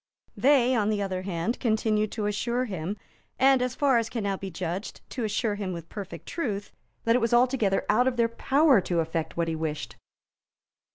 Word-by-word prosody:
They, 260 -2 +4
on 215 -3 +2
the 210 -1 0
other 185 -2 -3
hand, 185 +4 -2
continued 215 -2 +1
to 215 -3 -2
assure 235 +5 0
him, 190 -2 -4 0.4
and, 265 -1 +5
as 250 0 -1
far 270 -4 +3
as 230 -1 -3
can 230 -3 -3
now 200 -1 0
be 195 0 -6
judged, 180 +3 -5
to 250 - -3
assure 215 +1 0
him 200 -3 -3
with 170 -1 -8
perfect 185 -6 -7
truth, 210 -11 -3 0.3
that 230 +1 +3
it 250 - +2
was 230 +1 +2
altogether 240 -5 +2
out 245 +5 +3
of 255 -2 0
their 235 -1 +4
power 270 +1 +3
to 175 -1 -1
effect 165 0 -2
what 170 -1 +1
he 165 - -1
wished. 155 -1 -4
215 Hz, 195 wpm, -27 LUFS, 185-245 Hz, 0.4 s, and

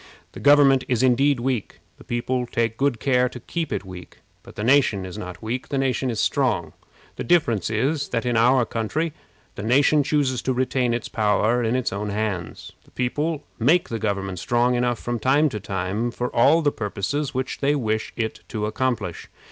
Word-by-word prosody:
The - - -10
government 140 -2 +5
is 125 -1 +1
indeed 130 +2 +3
weak. 125 -3 -2 0.2
The - - -13
people 125 +1 -2
take 115 -1 -1
good 135 -2 0
care 125 -2 +2
to 125 - -9
keep 165 +5 -4
it - - -3
weak. 90 -2 -11 0.2
But - - -15
the 105 - -4
nation 120 -6 +3
is 95 - -8
not 90 -3 -8
weak; 120 +4 -3
the 140 - -1
nation 130 -1 0
is 115 -3 -3
strong. 120 - 0 0.4
The - - -3
difference 120 - +2
is, 135 +7 0
that 115 - -2
in 120 -1 0
our 125 +2 +4
country 145 +10 -2 0.4
the - - -7
nation 140 +7 +4
chooses 140 -3 0
to 130 - -1
retain 125 -1 0
its 120 - -4
power 110 +2 +1
in 115 +2 0
its 130 -6 -1
own 105 +1 -3
hands. 100 -5 -4
The - - -23
people 145 +5 -2 0.2
make 160 +10 +3
the 115 - -3
government 100 -3 -2
strong 120 +2 +1
enough 120 -1 +1
from 120 +1 -3
time 145 +6 +3
to 110 -5 -5
time 100 +4 -2
for 125 +1 -4
all 155 +8 +5
the 145 - +3
purposes 115 +8 -3
which 130 0 -3
they 145 +1 +2
wish 110 -5 -1
it 110 -2 -2
to 110 -3 -3
accomplish. 110 -6 -2
120 Hz, 195 wpm, -23 LUFS, 110-135 Hz, 0.4 s, government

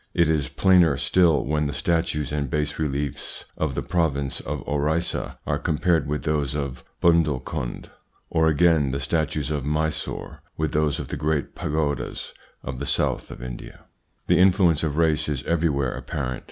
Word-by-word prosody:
It 85 -2 +4
is 75 -5 0
plainer 90 -6 +4
still 85 -5 +3
when 75 +1 0
the 70 - -4
statues 80 -6 0
and 75 -2 -1
bas 75 +2 -1
reliefs 70 -2 -2
of - - -2
the - - -2
province 70 -6 0
of 75 -2 -5
Orissa 75 +4 -1
are - - 0
compared 80 0 +1
with 75 +1 -2
those 75 -3 0
of 70 -3 -4 0.2
Bundelkund, 75 -7 +1 0.4
or, 80 0 +2
again, 80 -2 +4
the 70 +1 -2
statues 75 +1 -1
of 75 -3 -1
Mysore 75 +2 -2 0.2
with 80 0 -1
those 75 -1 +1
of - - -6
the - - -3
great 75 0 -1
pagodas 75 -1 -2 0.3
of 60 - -5
the - - -3
South - - +1
of - - -9
India. 65 -1 -8 0.4
The 90 0 +3
influence 90 -4 +4
of 75 -2 -1
race 80 -2 +2
is 70 -3 -2
everywhere 75 -6 +1
apparent. 65 -4 -4
75 Hz, 165 wpm, -24 LUFS, 70-80 Hz, 0.4 s, It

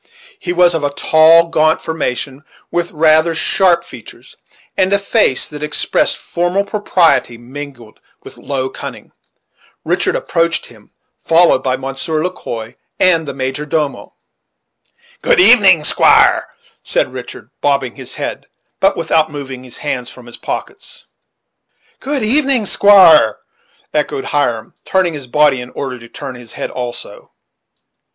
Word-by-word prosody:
He - - -3
was 175 0 +3
of 160 -3 -2
a 145 - +1
tall, 160 +3 +4
gaunt 155 -1 +2
formation, 140 -3 -4 0.3
with 175 0 -1
rather 160 +1 +2
sharp 170 +1 +3
features, 120 -4 -14 0.4
and 190 0 +1
a 200 - +4
face 200 - +1
that 150 -1 -10
expressed 150 -1 0
formal 175 +3 -1
propriety 175 - +1
mingled 125 -2 -11 0.2
with - - -12
low 130 -2 -4
cunning. - - -9 0.7
Richard - - 0
approached 170 0 -1
him, - - -18 0.3
followed 165 -5 +4
by 130 -1 -1
Monsieur 135 +4 -3
Le 180 - -1
Quoi 115 -8 -8 0.2
and 165 -4 +3
the - - -4
major 135 +2 -3
domo. 150 -1 -3 1.1
"Good - - +2
evening, 200 - +6
squire," - - +3 0.3
said - - -1
Richard, - - -9
bobbing 140 -3 0
his - - -8
head, - - -6 0.3
but - - +2
without 160 -1 +1
moving 135 -4 -8
his 125 -2 -9
hands 130 -4 -4
from 125 - -14
his 120 - -9
pockets. - - -7 0.9
"Good 275 -2 -2
evening, 265 0 +2
squire," 185 - +6 0.6
echoed 150 -2 -2
Hiram, 120 -6 -2
turning 185 -3 0
his 140 -4 -7
body 145 -1 +2
in 125 - -9
order 130 -1 -6
to 115 0 -14
turn 140 -3 -8
his 120 -2 -12
head - - -5
also. 125 -1 -7
150 Hz, 140 wpm, -15 LUFS, 130-175 Hz, 1.1 s, evening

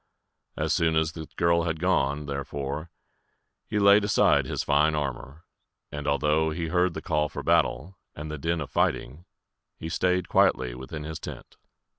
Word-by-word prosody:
As - - 0
soon 80 -1 +2
as 80 0 +1
the 80 -1 -8
girl 85 0 +2
had 80 -1 -2
gone, 75 -5 +1
therefore, 70 +2 -4 0.8
he - - -2
laid 100 0 +6
aside 105 - +3
his - - -2
fine 75 +2 +3
armor; 70 +2 -5 0.5
and 75 0 -5
although 75 +2 +2
he 80 +1 -3
heard 90 0 +1
the 80 - -6
call 75 -3 0
for - - -6
battle, 90 +9 +1 0.2
and 75 +1 -6
the 75 - -5
din 85 +3 -1
of 70 - -6
fighting, 75 +8 -1 0.5
he 80 - -6
staid 90 +1 0
quietly 60 -2 +2
within 65 +5 -7
his 80 0 -6
tent. - - -9
80 Hz, 165 wpm, -26 LUFS, 75-85 Hz, 0.8 s, laid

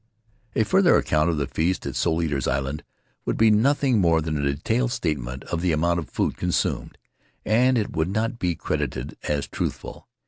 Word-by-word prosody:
A 110 - +3
further 185 - +4
account 75 +2 +2
of 80 - 0
the 70 - 0
feast 85 +7 -1
at - - -4
Soul 80 +1 +1
Eaters' 70 -4 -1
Island 65 +3 -2 0.4
would - - -2
be 110 -1 +5
nothing 130 +2 +3
more 85 -2 +4
than 80 0 -2
a 70 -1 +1
detailed 120 - 0
statement 65 - -3
of 85 - -3
the 90 -1 +1
amount 85 +3 +1
of 80 - -7
food - - -1
consumed, 90 -1 -1 0.5
and 125 +4 +3
it 110 - -2
would 80 +2 0
not 115 +4 -1
be 90 -2 0
credited - - -3
as 75 -2 0
truthful. - - -5
85 Hz, 185 wpm, -24 LUFS, 75-110 Hz, 0.5 s, be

